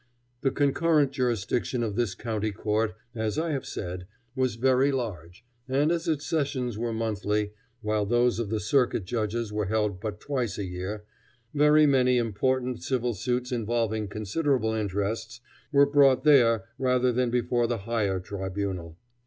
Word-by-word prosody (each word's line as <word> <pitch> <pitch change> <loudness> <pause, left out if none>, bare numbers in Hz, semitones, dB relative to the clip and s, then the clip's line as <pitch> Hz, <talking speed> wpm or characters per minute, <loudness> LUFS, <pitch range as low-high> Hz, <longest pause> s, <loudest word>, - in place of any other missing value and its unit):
The 135 - +2
concurrent 145 +1 +2
jurisdiction 120 -1 -1
of 105 -3 -2
this 115 -6 0
County 110 -2 -2
Court, 105 +2 -1 0.2
as 110 0 -2
I 165 +1 0
have 140 -3 -3
said, 90 -1 -5 0.3
was 130 -3 0
very 130 +3 +3
large, 105 - -5 0.2
and 145 +4 +2
as 170 0 -1
its 155 -2 0
sessions 135 -7 -1
were 115 +2 -2
monthly, 105 -2 -1 0.3
while 105 -1 0
those 120 +1 +2
of 115 -4 -2
the 110 0 -1
circuit 120 -2 +1
judges 110 +1 -2
were 105 -2 -1
held 105 -3 0
but 105 -2 -4
twice 125 -7 -2
a 100 - -2
year, 95 +4 -5 0.5
very 150 +1 +5
many 125 -3 +4
important 125 +2 0
civil 125 -2 -1
suits 125 +4 -2
involving 115 -2 -1
considerable 110 +3 0
interests 110 +3 -2 0.3
were 140 -1 +6
brought 140 -2 +4
there 120 -8 +5 0.2
rather 125 -1 +2
than 125 0 +1
before 120 0 +1
the 120 - -1
higher 105 -5 0
tribunal. 95 -3 -4
115 Hz, 155 wpm, -27 LUFS, 105-130 Hz, 0.5 s, were